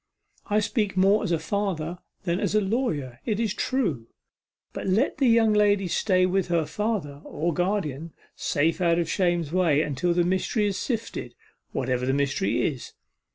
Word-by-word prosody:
I 210 0 +2
speak 210 -3 -1
more 195 +3 +4
as 200 - -2
a 170 - +3
father 175 -1 -2 0.2
than 175 -1 0
as - - -1
a - - +5
lawyer, 170 - -2
it 215 -2 -1
is 220 -4 0
true, 180 - -1 0.7
but, - - -5
let 210 +9 +1
the 270 - +4
young 225 -2 +4
lady 205 -2 +3
stay 185 +1 +2
with 185 0 0
her 170 -2 +1
father, 190 -9 -3
or 170 +2 -2
guardian, 170 -4 -2 0.2
safe 160 +4 0
out 170 -1 +3
of 170 -2 0
shame's 175 -4 0
way, 165 -5 +3
until 150 +4 -1
the 175 - +3
mystery 190 +4 0
is 200 -2 -1
sifted, 230 -3 -4 0.4
whatever 125 -1 -1
the 130 - +2
mystery 140 +7 0
is. 135 -5 -4
180 Hz, 170 wpm, -25 LUFS, 155-210 Hz, 0.7 s, a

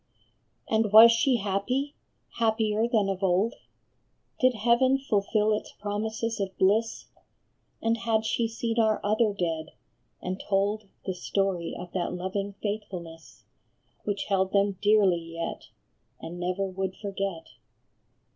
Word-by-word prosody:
And 220 -2 +1
was 225 +2 +10
she 250 +3 +3
happy, 230 +8 -1 0.5
happier 220 -1 +2
than 220 -5 +2
of 195 -1 -2
old? 190 +4 +2 0.9
Did 255 -1 +4
heaven 240 +4 +3
fulfil 215 -4 +1
its 210 - -4
promises 220 +2 -3
of 195 -1 -3
bliss? 220 +4 +1 0.8
And 225 0 +2
had 225 -1 0
she 230 +1 +1
seen 230 0 -2
our 220 -1 +3
other 215 +1 +2
dead, 165 -5 -3 0.5
and 185 +1 -4
told 205 +1 0 0.2
The 190 - -1
story 185 -2 -1
of 180 0 -8
that 180 -1 -2
loving 190 +3 -3
faithfulness 175 - -6 0.6
Which 205 -1 -2
held 190 -1 0
them 200 -1 +2
dearly 205 -5 +4
yet 165 0 -6 0.5
and 175 +2 -8
never 180 +2 -1
would 190 0 -3
forget? 195 -5 -4
205 Hz, 125 wpm, -27 LUFS, 190-225 Hz, 0.9 s, was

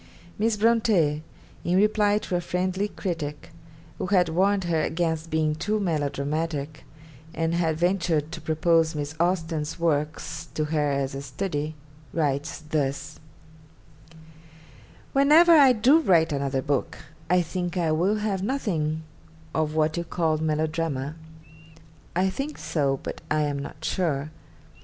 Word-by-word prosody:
Miss 220 0 +1
Bronte, 210 -9 +3 0.4
in 175 - +1
reply 210 0 +3
to 185 - -3
a 175 - +1
friendly 185 +3 -1
critic, 165 -6 -5 0.5
who - - -2
had 180 -4 +3
warned 190 +4 +2
her 165 -2 +1
against 160 0 -1
being 155 -1 +1
too 210 +7 -1
melodramatic, 150 -3 -2 0.5
and 165 0 0
had 165 -2 +1
ventured 170 -3 +1
to 170 -2 -7
propose 160 0 +2
Miss 145 0 -3
Austen's 165 -3 -1
works 160 0 -1
to 155 - 0
her 150 -1 0
as 140 -1 -1
a 135 - -5
study, 150 +2 -3 0.4
writes 145 -1 -1
thus: 150 -3 -2 1.9
'Whenever 300 +5 +6
I 285 -5 +8
do 250 +7 +5
write 165 - +3
another 135 -1 -1
book, 140 -3 -1 0.3
I 180 0 +4
think 175 +2 -3
I 165 -3 +1
will 180 +7 +2
have 210 -3 -1
nothing 165 - -1 0.5
of 155 -1 0
what 155 +1 +1
you 170 - -1
call 160 -2 0
"melodrama." 155 -2 -1 1.0
I 190 +2 +2
think 285 +8 -4
so, 140 -4 0
but - - -6
I 155 0 +2
am 145 -1 -1
not 150 +2 -7
sure. 155 -5 -1
160 Hz, 135 wpm, -25 LUFS, 150-185 Hz, 1.9 s, I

